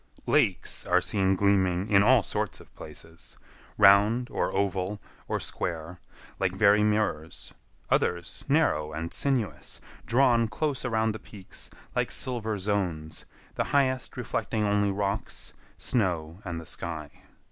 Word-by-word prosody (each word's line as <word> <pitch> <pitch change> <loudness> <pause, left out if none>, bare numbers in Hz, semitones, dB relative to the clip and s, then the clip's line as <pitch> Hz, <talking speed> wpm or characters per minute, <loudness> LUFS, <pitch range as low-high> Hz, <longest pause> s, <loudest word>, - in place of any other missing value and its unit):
Lakes - - +2
are - - +4
seen 95 -1 +1
gleaming 95 -1 +2
in 100 -1 +6
all 120 +1 +5
sorts - - -3
of - - -17
places,—round, 100 - +1
or - - 0
oval, 100 +1 -1 0.3
or - - -1
square, 85 +1 -4 0.4
like 95 -2 +1
very 105 +1 +5
mirrors; 105 -7 -1 0.4
others 85 0 0
narrow 80 - +2
and 80 +2 -4
sinuous, 130 -8 -1 0.3
drawn 120 -2 +4
close 145 +4 -2
around 110 -3 +1
the 110 - -6
peaks 95 -3 -8 0.3
like - - +1
silver 110 -4 0
zones, 90 -6 -2 0.3
the - - -1
highest 130 -2 0
reflecting 110 - -2
only 100 0 +2
rocks, 100 +1 -2 0.2
snow, 90 -5 -1
and 85 -3 -4
the 80 - -10
sky. 80 -3 -5
100 Hz, 125 wpm, -28 LUFS, 90-110 Hz, 0.4 s, in